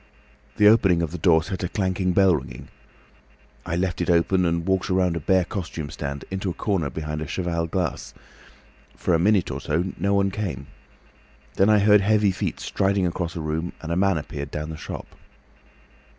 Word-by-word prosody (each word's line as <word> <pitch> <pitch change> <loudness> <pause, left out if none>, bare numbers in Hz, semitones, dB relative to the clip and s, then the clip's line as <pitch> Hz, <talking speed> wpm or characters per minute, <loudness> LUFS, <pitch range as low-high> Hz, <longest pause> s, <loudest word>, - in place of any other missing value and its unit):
The 105 - +6
opening 95 -6 +5
of 80 - -3
the 90 - -6
door 80 -1 +4
set 95 0 -5
a 90 - -1
clanking 95 -2 0
bell 95 -1 +4
ringing. 65 -1 -7 1.0
I 85 - -1
left 90 0 -1
it - - -1
open, 90 +2 +3
and 85 0 0
walked 95 +1 0
round 90 -2 +2
a - - -1
bare 95 +3 +2
costume 85 -8 -5
stand, 70 -1 -5
into 95 0 -2
a 85 - -5
corner 95 -9 -1
behind 75 +2 -5
a 75 - -4
cheval 85 0 -2
glass. 90 -1 -3 0.8
For 90 - 0
a 85 - +3
minute 95 -2 +2
or 70 +1 -5
so 85 +5 -1
no 100 +3 +1
one 100 0 +2
came. 95 -9 -4 0.9
Then 95 +7 +3
I 105 - +6
heard 105 0 +5
heavy 105 0 +3
feet - - -3
striding 95 -1 0
across 85 -1 -3
a 85 - -4
room, 80 +3 -3
and 80 - -6
a - - 0
man 95 -1 +2
appeared 75 -2 -6
down 75 +2 -5
the - - -6
shop. 80 - -7
90 Hz, 195 wpm, -24 LUFS, 80-95 Hz, 1.0 s, The